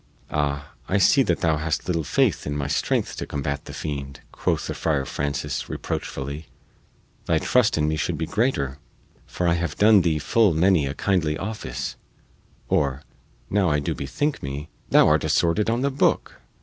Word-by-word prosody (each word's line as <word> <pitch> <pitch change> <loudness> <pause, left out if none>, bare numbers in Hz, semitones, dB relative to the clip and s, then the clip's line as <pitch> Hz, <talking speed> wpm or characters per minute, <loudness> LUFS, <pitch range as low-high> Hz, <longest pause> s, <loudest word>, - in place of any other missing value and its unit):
"Ah, 70 0 -1 0.2
I 100 - +2
see 135 +8 +5
that 90 -10 +1
thou 80 -2 +2
hast 80 0 -2
little 85 -3 0
faith - - +1
in 75 0 -2
my 70 - -2
strength 70 - -1
to - - -4
combat 70 0 -3
the - - -8
fiend," 70 -3 -5
quoth - - -1
the - - -3
Friar 75 -4 0
Francis 70 0 -3
reproachfully. 70 +3 -4 0.8
"Thy 80 - +3
trust 120 +5 +2
in 75 -1 +2
me 80 0 0
should 85 0 -1
be 80 - -2
greater, 75 - 0 0.5
for 90 - -2
I 85 - +4
have 85 -3 -2
done 105 -1 +6
thee 80 -3 +1
full 100 +4 +3
many 85 -3 +3
a 70 - -4
kindly 80 -6 0
office; 75 - -5 0.7
or, 70 -1 0 0.4
now 100 -3 +2
I 75 - +2
do 70 - -1
bethink 145 - -2
me, 70 +2 -5 0.2
thou - - +6
art - - +3
assorted 90 +6 +2
on 120 +2 +1
the 140 +1 +1
booke! 135 - 0
80 Hz, 175 wpm, -24 LUFS, 70-95 Hz, 0.8 s, done